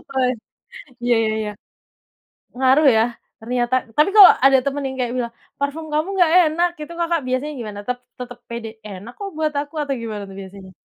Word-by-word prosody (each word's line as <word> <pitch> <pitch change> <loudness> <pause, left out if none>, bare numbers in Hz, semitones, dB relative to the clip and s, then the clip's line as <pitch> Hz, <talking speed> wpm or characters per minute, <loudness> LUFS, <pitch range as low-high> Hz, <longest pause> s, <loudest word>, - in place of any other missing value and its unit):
Wah, 260 -2 +1 0.7
iya, 240 0 +3
ya 220 - 0
ya. 210 - -3 1.1
Ngaruh 265 +4 +4
ya, 220 - +4 0.4
ternyata? 240 +2 0 0.2
Tapi 300 +5 +5
kalau 405 -3 +11
ada 270 0 +7
temen 280 0 -2
yang 265 - -5
kayak 245 -1 -1
bilang, 235 -1 -3 0.3
"Parfum 285 +3 -3
kamu 305 +3 +1
nggak 345 -3 +4 0.2
enak." 345 +3 +1
gitu 305 +3 -7
Kakak 335 -1 0
biasanya 255 +4 -2
gimana? 210 -3 -6
Tetap 250 0 -1 0.2
tetep 245 -1 -8
pede, 235 -1 -5 0.2
"Enak 205 +4 -9
kok, 400 -1 -5
buat 310 -1 0
aku." 295 +2 -10
atau 280 -1 -2
gimana 215 -3 -5
tuh 195 - -11
biasanya? 190 0 -11
255 Hz, 185 wpm, -21 LUFS, 235-300 Hz, 1.1 s, kalau